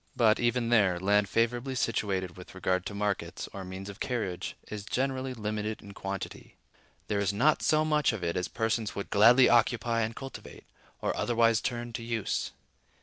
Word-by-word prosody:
But, 110 -2 +4
even 120 0 +1
there, 100 -7 +4
land 100 +1 +2
favorably 120 +5 0
situated 95 -6 -1
with 90 0 -12
regard 95 -1 0
to 105 - -6
markets, 105 -1 -2
or 100 - -6
means 95 +1 -7
of 100 0 -9
carriage, 105 -8 -3
is 105 -1 -6
generally 130 +2 -2
limited 110 -1 -3
in 100 - -11
quantity: 100 -1 -6 0.5
there 105 - 0
is 100 -1 +1
not 135 +10 +3
so 155 0 +3
much 150 -3 +2
of 110 -5 -5
it 85 - -1
as 90 -1 -1
persons 110 -1 -1
would 100 - -5
gladly 120 +5 +7
occupy 120 0 +3
and 110 +1 -2
cultivate, 135 -1 -9 0.4
or - - 0
otherwise 115 -1 +2
turn 120 -1 -3
to 115 - -4
use. 115 -3 -2
110 Hz, 175 wpm, -29 LUFS, 100-120 Hz, 0.5 s, gladly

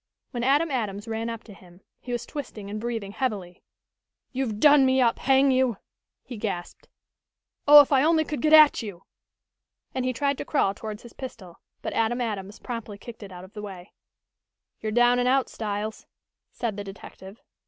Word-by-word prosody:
When 240 -3 -3
Adam 290 +5 +3
Adams 210 -5 -3
ran 225 +1 -3
up 230 -1 -6
to 210 - -13
him 180 -2 -17 0.2
he 250 - -8
was 240 - -3
twisting 215 -9 -7
and 210 0 -4
breathing 225 -4 -4
heavily. 200 -7 -3 0.7
"You've 250 -6 -2
done 290 +1 +7
me 260 0 +3
up, 235 -2 +2
hang 270 +1 +4
you!" 255 -4 +2 0.5
he 245 - -8
gasped. 195 -5 -5 0.8
"Oh, 295 0 +11
if 285 - -1
I 270 -1 +4
only 320 0 +4
could 295 -4 -4
get 310 - +2
at 310 -3 +8
you!" 200 -5 -8 0.9
and 260 - -2
he 255 - 0
tried 280 +2 -1
to - - -2
crawl 235 -10 +1
towards 215 +1 -7
his 240 - -13
pistol, 200 -10 -9 0.2
but - - -3
Adam 230 +2 +1
Adams 205 -4 -4
promptly 230 -4 -6
kicked 230 +3 -11
it 200 -2 -9
out 180 0 -10
of 185 - -14
the 210 - -7
way. 190 -3 -9 0.9
"You're 215 - -3
down 240 +2 +4
and 245 - +1
out, 265 +1 +2
Styles," 215 0 -4 0.4
said 225 -4 -3
the 205 - -4
detective. 195 +1 -11
230 Hz, 185 wpm, -26 LUFS, 205-260 Hz, 0.9 s, Oh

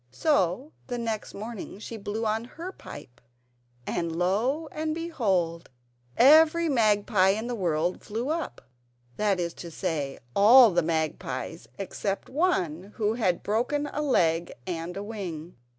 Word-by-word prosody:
So 195 - +1 0.2
the 245 -2 -3
next 225 -3 -4
morning 215 -1 -7
she 220 +2 -7
blew 215 +1 -4
on 220 +2 0
her 335 +9 -8
pipe, 145 - -12 0.6
and 170 -1 -2
lo! 225 - 0
and 310 0 -2
behold 195 - -1 0.5
every 315 +5 +6
magpie 210 -7 +3
in 215 +4 0
the 245 - -3
world 175 -4 -1
flew 230 +6 -4
up. 325 0 -3 0.6
That 205 -3 +1
is 170 -1 -2
to 170 - -9
say, 155 -5 -3 0.2
all 230 +3 +8
the 175 0 +2
magpies 160 -2 -3
except 195 0 -3
one 200 - 0
who 215 -1 +1
had 190 -7 0
broken 245 +8 0
a 300 - -1
leg 170 - +2
and 175 +1 -4
a 200 - -4
wing. 180 -6 -6
205 Hz, 140 wpm, -27 LUFS, 175-250 Hz, 0.6 s, all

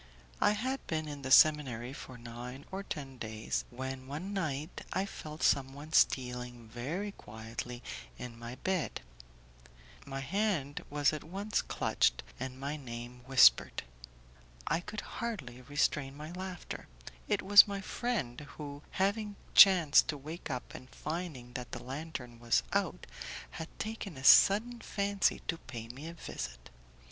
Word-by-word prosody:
I - - +5
had 260 +6 -2
been 155 -1 -1
in 145 -1 -6
the 130 - -4
seminary 130 -4 +5
for 130 -2 -9
nine 120 +3 -8
or 190 +1 -3
ten 135 -9 -6
days, 110 -1 -3
when 130 +1 -5
one 160 +9 -5
night 155 -4 -2
I 190 - 0
felt 155 -5 -7
someone 140 +3 +1
stealing 125 -4 +2
very 155 - -3
quietly 115 - -7 0.3
in 120 -2 -8
my 120 +1 -6
bed; 185 +2 -1 1.0
my 135 -1 -5
hand 175 -4 -1
was 145 0 +2
at 155 - -4
once 200 +5 -1
clutched, - - +1 0.2
and 130 +1 -5
my 140 +3 -3
name 120 -2 -8
whispered. 65 - +6 0.8
I 165 - +1
could 205 +4 -6
hardly 165 - -5
restrain 140 +1 0
my 155 +2 -7
laughter. 185 0 -6 0.4
It - - +1
was 205 +2 +9
my 200 -1 -3
friend, 190 - -2 0.2
who, 145 -1 -7 0.2
having 205 +2 +1 0.2
chanced 175 -7 +8
to 150 - -2
wake 155 +5 -7
up 125 -2 -4
and 130 - -10
finding 150 -7 -5
that 125 -1 -6
the - - -5
lantern 130 -3 -6
was 115 - +2
out, - - 0 0.5
had 160 - -6
taken 215 -7 -5
a 130 - -8
sudden 220 - +7
fancy 200 -1 0
to 165 - -1
pay 115 -2 -8
me 135 +6 -8
a 170 - -7
visit. - - -7
145 Hz, 145 wpm, -32 LUFS, 125-185 Hz, 1.0 s, was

